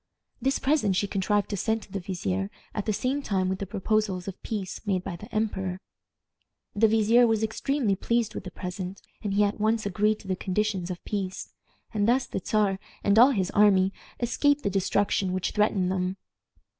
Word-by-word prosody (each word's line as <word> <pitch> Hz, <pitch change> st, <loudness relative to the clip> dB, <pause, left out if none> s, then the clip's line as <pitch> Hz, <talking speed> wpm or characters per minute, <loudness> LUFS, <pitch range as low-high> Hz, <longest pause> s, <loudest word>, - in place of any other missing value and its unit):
This 270 Hz, +1 st, +1 dB
present 265 Hz, -9 st, +2 dB
she 205 Hz, -, +1 dB
contrived 200 Hz, +1 st, 0 dB
to 205 Hz, -, -1 dB
send 220 Hz, +3 st, 0 dB
to -, -, -17 dB
the 195 Hz, -, -3 dB
vizier 100 Hz, -, -2 dB, 0.2 s
at 210 Hz, -1 st, -3 dB
the -, -, +3 dB
same 255 Hz, +7 st, -1 dB
time 190 Hz, -7 st, 0 dB
with 190 Hz, 0 st, -2 dB
the 200 Hz, -, -4 dB
proposals 200 Hz, -2 st, -1 dB
of 195 Hz, -, -7 dB
peace 205 Hz, -4 st, -4 dB
made 185 Hz, -3 st, +1 dB
by 175 Hz, -, -4 dB
the 210 Hz, +7 st, -11 dB
emperor. 190 Hz, -4 st, -1 dB, 1.0 s
The 220 Hz, +2 st, +5 dB
vizier 225 Hz, +2 st, +5 dB
was 225 Hz, -1 st, +1 dB
extremely 220 Hz, 0 st, 0 dB
pleased 235 Hz, +2 st, 0 dB
with -, -, -5 dB
the 185 Hz, -, -6 dB
present, 180 Hz, +1 st, -6 dB, 0.2 s
and 200 Hz, -2 st, -2 dB
he 210 Hz, -, +4 dB
at 205 Hz, +1 st, 0 dB
once 220 Hz, +1 st, +1 dB
agreed 210 Hz, +2 st, +1 dB
to -, -, -14 dB
the 190 Hz, -, 0 dB
conditions 190 Hz, -1 st, -1 dB
of 180 Hz, -1 st, -6 dB
peace, 195 Hz, -3 st, -4 dB, 0.4 s
and 205 Hz, -1 st, +1 dB
thus 250 Hz, +2 st, +3 dB
the -, -, -4 dB
Czar 205 Hz, -3 st, +1 dB, 0.2 s
and 200 Hz, +2 st, +4 dB
all 250 Hz, +3 st, +9 dB
his 195 Hz, -8 st, 0 dB
army 195 Hz, -2 st, +4 dB, 0.3 s
escaped 285 Hz, +4 st, +2 dB
the 200 Hz, -, 0 dB
destruction 195 Hz, 0 st, +1 dB
which 185 Hz, -1 st, -1 dB
threatened 200 Hz, -3 st, +2 dB
them. 185 Hz, 0 st, -1 dB
205 Hz, 195 wpm, -27 LUFS, 185-220 Hz, 1.0 s, all